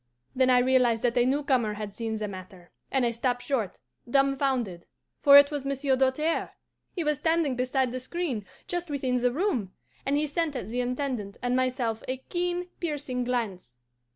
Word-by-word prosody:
Then 260 0 +3
I 250 - +6
realized 245 -2 +3
that 240 -1 +2
a 245 0 +3
new 285 +3 +1
corner 240 -7 +1
had 205 -1 -6
seen 225 0 -3
the 215 -1 -3
matter, 185 -2 -10 0.2
and 265 -2 +2
I 235 - +2
stopped 245 +1 -1
short, 235 -9 -1 0.3
dumfounded 265 -8 +1 0.3
for 280 0 +9
it 285 +1 +7
was 290 -2 -3
Monsieur 275 0 0
Doltaire! 270 +5 0 0.4
He 350 - -1
was 300 -2 0
standing 320 -5 +1
beside 255 0 0
the 255 - -3
screen, 260 -4 -3 0.2
just 350 -1 -3
within 260 -3 0
the 245 0 +2
room, 255 - -1 0.3
and 280 +1 +1
he 300 - +1
sent 305 0 -1
at 225 -5 -4
the 245 +2 -1
Intendant 250 -5 -3
and 245 0 +1
myself 255 -3 0
a 255 - -2
keen, 355 +5 -2
piercing 285 -6 -2
glance. 210 - -3
255 Hz, 180 wpm, -27 LUFS, 235-285 Hz, 0.4 s, for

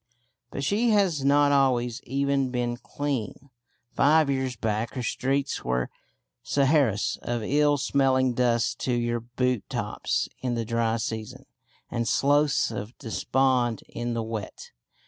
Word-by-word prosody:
But 140 - -5
she 215 - +2
has 190 -9 +2
not 145 +1 +4
always 125 -4 +2
even 140 0 0
been 120 -1 -1
clean. 135 +1 -4 0.4
Five 150 0 +4
years 130 -2 -1
back 110 +2 -2
her 125 - -3
streets 135 +4 -1
were 60 0 -1 0.5
Saharas 135 -7 +2
of 120 -2 -3
ill 145 +4 +3
smelling 130 -2 +2
dust 120 -1 +1
to 125 - -1
your 120 0 0
boot 125 0 -1
tops - - -2
in 125 -2 -2
the 115 -1 -2
dry 115 0 0
season, 110 -1 -5 0.5
and 120 -1 -1
sloughs 145 +5 +2
of 105 +5 -6
despond 125 -1 0
in 120 0 -3
the 115 - -1
wet. 110 -2 -6
125 Hz, 135 wpm, -26 LUFS, 115-140 Hz, 0.5 s, not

